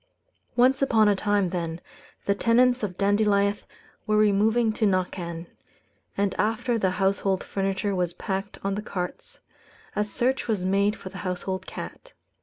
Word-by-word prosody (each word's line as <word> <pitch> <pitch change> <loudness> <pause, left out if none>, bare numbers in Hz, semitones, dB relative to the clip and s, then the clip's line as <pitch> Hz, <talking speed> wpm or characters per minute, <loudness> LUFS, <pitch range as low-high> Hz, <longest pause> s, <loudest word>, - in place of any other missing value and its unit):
Once 255 +3 +4
upon 225 -6 +4
a 205 - +4
time, 200 -2 +1
then, 170 -2 -3 0.5
the 200 - +3
tenants 245 +4 +3
of 190 -4 -3
Dandilieth 200 0 +2 0.4
were 215 0 +3
removing 215 +2 +3
to 215 -1 +1
Knockan; 180 -3 -2 0.7
and 200 -1 +1
after 230 +2 +1
the 190 - +2
household 195 0 +1
furniture 195 +1 -1
was 180 -2 -1
packed 195 +2 -4
on 195 0 0
the 205 - -2
carts, 180 -4 -6 0.5
a 210 - +2
search 245 +6 -1
was 205 -5 0
made 200 +2 +2
for 190 - -9
the 185 - -9
household 185 0 -3
cat. - - -8
200 Hz, 150 wpm, -26 LUFS, 190-215 Hz, 0.7 s, Once